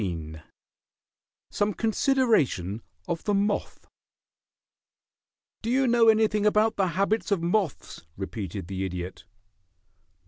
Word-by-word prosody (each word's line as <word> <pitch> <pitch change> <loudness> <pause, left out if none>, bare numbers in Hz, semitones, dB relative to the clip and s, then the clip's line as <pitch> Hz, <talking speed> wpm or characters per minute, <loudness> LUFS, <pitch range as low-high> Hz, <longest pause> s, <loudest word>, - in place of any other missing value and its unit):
XIV 80 -5 -5 1.1
SOME 205 0 0
CONSIDERATION 220 - +1 0.3
OF 165 - -3
THE 205 - +1
MOTH 205 +1 -1 1.8
"Do 225 - -3
you 265 +2 +3
know 235 -2 +4
anything 220 -1 +4
about 210 +1 +3
the 195 -2 +1
habits 205 +3 +1
of 195 -5 0
moths?" 180 -2 -1 0.2
repeated 100 -2 -5
the 95 +1 -4
Idiot. 90 -1 -5
200 Hz, 105 wpm, -26 LUFS, -, 1.8 s, know